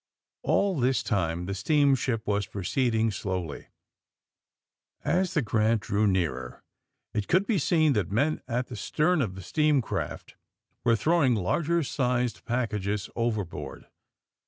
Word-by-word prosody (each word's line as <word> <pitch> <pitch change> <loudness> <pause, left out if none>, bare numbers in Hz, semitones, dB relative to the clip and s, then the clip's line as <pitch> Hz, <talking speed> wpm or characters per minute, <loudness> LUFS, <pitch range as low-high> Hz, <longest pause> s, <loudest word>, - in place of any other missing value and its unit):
All 195 -6 +1
this 130 0 +1
lime 90 -4 0
the 100 - -3
steamship 130 +1 +2
was 100 -2 0
proceeding 110 +4 0
slowly. 90 -6 -4 1.4
As 185 +1 +1
the 150 - +3
*^ - - -8
Grant" 110 0 +2
drew 105 0 +1
nearer 75 -10 -1 0.5
it 105 -2 -2
could 185 +3 +3
be 210 -5 +1
seen 155 -1 +3
that 105 -7 0
men 145 +10 +1
at 125 +1 -1
the 125 - -8
stern 155 - +1
of 100 -7 -2
the 95 - -8
steam 150 - +2
craft 120 - -4 0.5
were 115 - +4
throwing 150 -1 +3
large 155 - 0
sized 125 -2 -1
packages 105 -4 -2
overboard. 110 -6 -3
115 Hz, 135 wpm, -27 LUFS, 100-145 Hz, 1.4 s, were